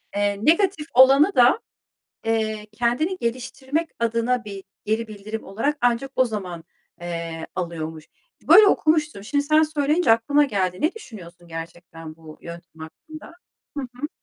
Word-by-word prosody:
eee, 205 0 0
negatif 335 -1 +2
olanı 275 +8 +6
da, 245 - +5 0.7
eee, 220 -1 -1
kendini 245 - 0
geliştirmek 265 +6 -3
adına 235 +1 0
bir 200 -2 -8 0.2
geri 220 +2 -1
bildirim 215 +1 -7
olarak 280 +10 -2
ancak 245 +2 +1
o 255 - +4
zaman, 185 -7 -6 0.4
eee, 165 -1 -5
alıyormuş. 160 -3 -5 0.4
Böyle 425 -1 +9
okumuştum. 305 - +1
Şimdi 285 +4 0
sen 310 +2 +4
söyleyince 305 -2 +2
aklıma 285 +6 +3
geldi. 185 -8 -2
Ne 315 +4 +1
düşünüyorsun 175 - -12
gerçekten 165 -1 -9
bu 160 -1 -14
yöntem 170 -1 -11
hakkında? 310 - -12 0.5
Hı 280 - -2
hı. 250 +3 -6
230 Hz, 135 wpm, -23 LUFS, 180-290 Hz, 0.7 s, Böyle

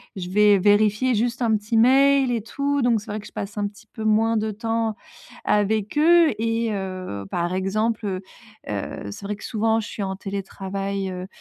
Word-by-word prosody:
je 180 -2 -5
vais 205 +1 +5
vérifier 210 +5 +3
juste 235 +3 -1
un 225 -2 +3
petit 210 +2 -4
mail 270 +2 +5
et 230 - 0
tout.», 280 +5 -1
donc 235 -3 +2
c'est 210 0 -8
vrai 215 - -3
que 210 - -11
je - - -16
passe 200 +1 -6
un 205 -1 0
petit 210 +2 -15
peu 220 - -8
moins 220 +1 +3
de 215 0 -1
temps 225 0 -1 0.5
avec 210 +3 +1
eux. 335 +1 +6
Et, 225 0 0
heu, 185 - -5
par 175 +1 -1
exemple, 215 +4 -1
heu 185 -1 -3 0.5
heu, 100 0 -4
c'est 200 - -9
vrai 210 +1 -2
que - - -14
souvent 225 0 +1
je - - -7
suis 205 - -5
en 190 0 -3
télétravail, 195 0 -4
heu, 180 +1 -6
210 Hz, 200 wpm, -23 LUFS, 195-230 Hz, 0.5 s, eux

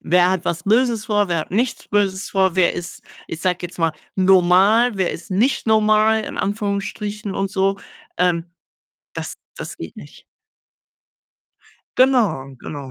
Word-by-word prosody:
wer 180 +2 +3
hat 185 -2 -1
was 165 -1 -2
Böses 230 +1 +2
vor, 205 -2 +1
wer 170 -1 0
hat - - -8
nichts 235 +5 -1
Böses 200 -2 0
vor? 190 -2 +2
Wer 180 -2 +3
ist, 175 0 -7 0.2
ich 165 - -7
sage 180 -1 0
jetzt 175 0 -7
mal, 165 -1 +1 0.2
normal, 190 +5 +4
wer 185 -2 0
ist 170 - -9
nicht 235 +6 +1
normal 215 0 +3
in - - -7
Anführungsstrichen 205 0 -3
und 195 0 -2
so? 195 0 0 0.4
Ähm, 175 -2 +2 0.7
das - - -6 0.2
das - - -7
geht - - -8
nicht. - - -13 1.8
Genau, 205 - +2
genau. 140 -3 -8
195 Hz, 150 wpm, -20 LUFS, 180-215 Hz, 1.8 s, normal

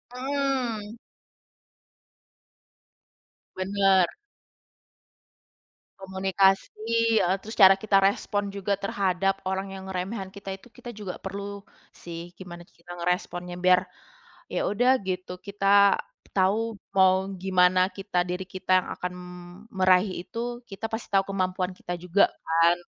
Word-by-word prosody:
Mmm. 255 -5 -2 2.6
Bener. 190 -1 +3 1.9
Komunikasi, 190 0 +1 0.5
eee, 185 +2 +2
terus 220 +2 -7
cara 195 -1 +9
kita 200 0 +2
respon 200 +1 +1
juga 200 0 -1
terhadap 195 -1 0
orang 190 0 -3
yang 190 - -8
ngeremehin 190 +2 -4
kita 195 -1 -6
itu, 195 - -17
kita 240 - -11
juga 200 -4 -6
perlu 200 +1 -6 0.3
sih 170 0 -9
gimana 175 -2 -9
kita 175 0 -13
ngeresponnya, 180 0 -2
biar 180 0 +5 0.7
ya - - 0
udah 245 +5 +3 0.2
gitu, 185 -1 -3 0.2
kita 200 0 +4 0.4
tahu 210 +3 +1 0.2
mau 190 0 +4
gimana 185 0 +3
kita, 195 -1 -4
diri 180 +1 -3
kita 185 0 -5
yang - - -10
akan 180 0 -4 0.6
meraih 185 0 +4
itu 240 +5 -5
kita 195 +3 -6
pasti 225 +1 -4
tahu 195 0 +4
kemampuan 185 -1 -1
kita 175 - -5
juga 180 +3 +3 0.2
kan. 165 +2 +3
190 Hz, 115 wpm, -26 LUFS, 185-200 Hz, 2.6 s, cara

